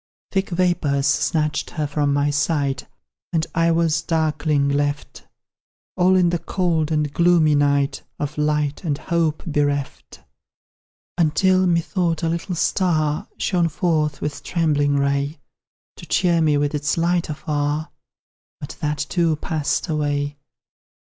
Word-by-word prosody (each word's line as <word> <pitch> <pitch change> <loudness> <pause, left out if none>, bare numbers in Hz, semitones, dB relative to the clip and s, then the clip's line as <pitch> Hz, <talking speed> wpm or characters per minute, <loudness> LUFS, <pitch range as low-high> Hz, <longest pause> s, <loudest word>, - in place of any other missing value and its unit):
Thick 195 0 0
vapours 170 -6 +1
snatched 150 +1 0
her 155 -2 -3
from 145 0 0
my 145 +1 +1
sight, 145 -1 -1 0.4
And 165 -2 0
I 165 0 +2
was 165 -1 +2
darkling 155 -3 0
left, 145 +1 -2 0.7
All 185 +1 +4
in 180 -2 +3
the 175 - 0
cold 165 -5 -1
and 150 -2 0
gloomy 170 -3 +4
night, 140 -1 +1 0.2
Of 145 0 -4
light 150 0 0
and 150 -5 -1
hope 165 -3 -1
bereft: 145 -3 -2 1.0
Until, 185 +3 +3
methought, 170 0 0
a 165 - +1
little 170 +2 -3
star 160 0 0
Shone 175 -4 +1
forth 155 -3 0
with 150 -1 -4
trembling 145 -4 +1
ray, 140 +2 0 0.6
To - - -11
cheer 170 -2 +2
me 150 -2 +3
with 145 +1 0
its 150 +2 -1
light 170 0 +1
afar 150 0 -2 0.7
But 145 - -8
that, 150 -1 -1
too, 165 -1 +1
passed 155 +1 -2
away. 145 -2 -1
155 Hz, 130 wpm, -21 LUFS, 145-170 Hz, 1.0 s, All